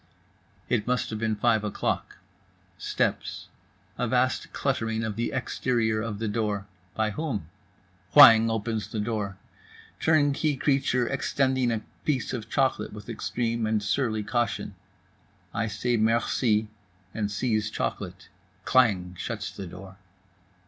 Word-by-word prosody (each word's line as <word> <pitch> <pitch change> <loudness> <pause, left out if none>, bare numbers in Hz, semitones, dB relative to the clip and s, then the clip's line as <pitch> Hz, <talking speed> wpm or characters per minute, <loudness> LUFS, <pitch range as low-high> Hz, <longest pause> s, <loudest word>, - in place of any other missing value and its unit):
It 115 -3 0
must 125 -1 0
have 110 - -3
been 110 -1 0
five 110 0 +2
o'clock. 105 - -2 0.6
Steps. - - -2 0.5
A 125 - +1
vast 125 +2 +1
cluttering 115 -5 -1
of 110 -2 -3
the 115 +2 -1
exterior 120 -4 0
of 105 -2 -4
the 110 +1 -2
door—by 105 -1 -2
whom? 110 - -3 0.7
Whang 115 -6 +10
opens 110 0 -2
the 110 - -4
door. 105 -3 -2 0.6
Turnkey 150 -1 +2
creature 135 -3 +2
extending 130 -3 +1
a 110 -1 -2 0.2
piece 135 -6 -1
of 115 -3 -5
chocolate 130 -7 0
with 105 +1 -10
extreme 115 0 -1
and 110 -1 0
surly 110 0 0
caution. 120 -2 -1 0.8
I 115 - 0
say 115 +3 0
"Merci" 110 0 +2 0.5
and 105 -2 -1
seize 110 0 0
chocolate. - - -4 0.4
Klang 100 -9 +3
shuts 110 0 -4
the 95 -2 -7
door. 95 +2 -11
110 Hz, 125 wpm, -27 LUFS, 105-125 Hz, 0.8 s, Whang